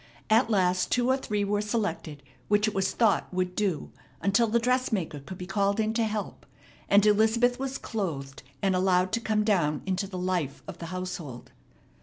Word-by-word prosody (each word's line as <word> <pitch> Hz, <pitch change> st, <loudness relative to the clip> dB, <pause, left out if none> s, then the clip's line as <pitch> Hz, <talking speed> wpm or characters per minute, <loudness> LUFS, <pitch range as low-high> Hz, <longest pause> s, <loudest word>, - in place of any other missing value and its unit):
At 225 Hz, +2 st, +4 dB
last 185 Hz, -3 st, +2 dB
two 245 Hz, 0 st, +2 dB
or -, -, +4 dB
three 210 Hz, -6 st, -2 dB
were 205 Hz, +1 st, 0 dB
selected 175 Hz, -, -3 dB, 0.2 s
which 210 Hz, +1 st, +3 dB
it 215 Hz, -, -1 dB
was 195 Hz, -1 st, 0 dB
thought 225 Hz, -4 st, +2 dB
would 180 Hz, 0 st, -2 dB
"do" 190 Hz, -8 st, -1 dB, 0.3 s
until 200 Hz, +7 st, +2 dB
the 225 Hz, +2 st, +2 dB
dressmaker 230 Hz, -, 0 dB
could 180 Hz, +7 st, -9 dB
be 180 Hz, -, -6 dB
called 200 Hz, +2 st, 0 dB
in 220 Hz, 0 st, +1 dB
to 230 Hz, 0 st, +1 dB
help, 215 Hz, -1 st, -5 dB, 0.4 s
and 200 Hz, +1 st, +5 dB
Elizabeth 225 Hz, +4 st, +3 dB
was 270 Hz, 0 st, -3 dB
clothed 145 Hz, -11 st, -4 dB, 0.2 s
and 195 Hz, -1 st, +2 dB
allowed 185 Hz, 0 st, +2 dB
to 230 Hz, +1 st, 0 dB
come 215 Hz, -2 st, +1 dB
down 170 Hz, -9 st, +1 dB
into 190 Hz, +1 st, -1 dB
the 190 Hz, -1 st, -7 dB
life 180 Hz, -6 st, -2 dB
of -, -, -8 dB
the 170 Hz, -, -6 dB
household. 180 Hz, -8 st, -6 dB
200 Hz, 185 wpm, -27 LUFS, 180-220 Hz, 0.4 s, and